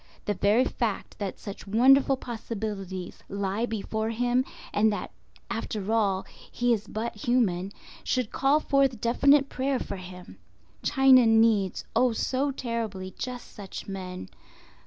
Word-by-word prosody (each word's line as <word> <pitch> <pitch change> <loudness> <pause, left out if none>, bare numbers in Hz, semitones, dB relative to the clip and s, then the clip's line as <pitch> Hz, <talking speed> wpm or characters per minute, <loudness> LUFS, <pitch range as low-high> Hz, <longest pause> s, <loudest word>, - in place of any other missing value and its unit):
The 205 - +1
very 210 +6 +3
fact 225 -7 -3
that 200 -3 -4
such 200 -1 -9
wonderful 265 +5 +5
possibilities 210 -6 -5
lie 200 +3 -1
before 220 0 -2
him, 245 +2 +1 0.3
and 215 +1 +3
that 205 - -4 0.4
after 220 -3 -3
all 200 -4 +1 0.3
he 245 0 +2
is 215 -2 -3
but 225 +2 -4
human, 200 -6 +1 0.3
should 250 -4 -1
call 275 +3 +3
forth 275 -5 +2
definite 275 +5 +4
prayer 270 0 -1
for 200 -5 -5
him. 180 - -11 0.4
China 265 -3 +6
needs—oh, 225 +2 +3
so 265 +5 0
terribly!—just 230 -1 -5
such 200 -3 -8
men. 185 - -6
225 Hz, 125 wpm, -27 LUFS, 200-250 Hz, 0.4 s, China